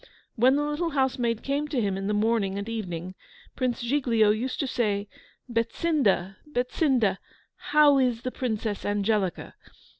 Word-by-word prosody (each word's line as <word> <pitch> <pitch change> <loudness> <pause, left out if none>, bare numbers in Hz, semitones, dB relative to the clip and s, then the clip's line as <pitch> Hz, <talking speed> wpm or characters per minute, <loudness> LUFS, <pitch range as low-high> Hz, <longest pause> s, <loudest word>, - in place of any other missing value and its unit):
When 255 +3 +4
the 295 - +1
little 295 +3 -1
housemaid 255 -5 0
came 285 +2 -1
to 290 -4 -1
him 200 -4 0
in 195 0 -3
the 210 - 0
morning 210 -2 +1
and 200 +1 -4
evening, 185 -6 -5 0.4
Prince 255 -1 -1
Giglio 235 -5 +3
used 240 +5 -2
to - - 0
say, 210 -5 -1 0.4
"Betsinda, 230 - 0
Betsinda, 245 - +1 0.5
how 295 -2 +6
is 245 -3 +1
the 255 - -2
Princess 220 -5 -3
Angelica?" 205 -2 -1
230 Hz, 145 wpm, -26 LUFS, 205-265 Hz, 0.5 s, how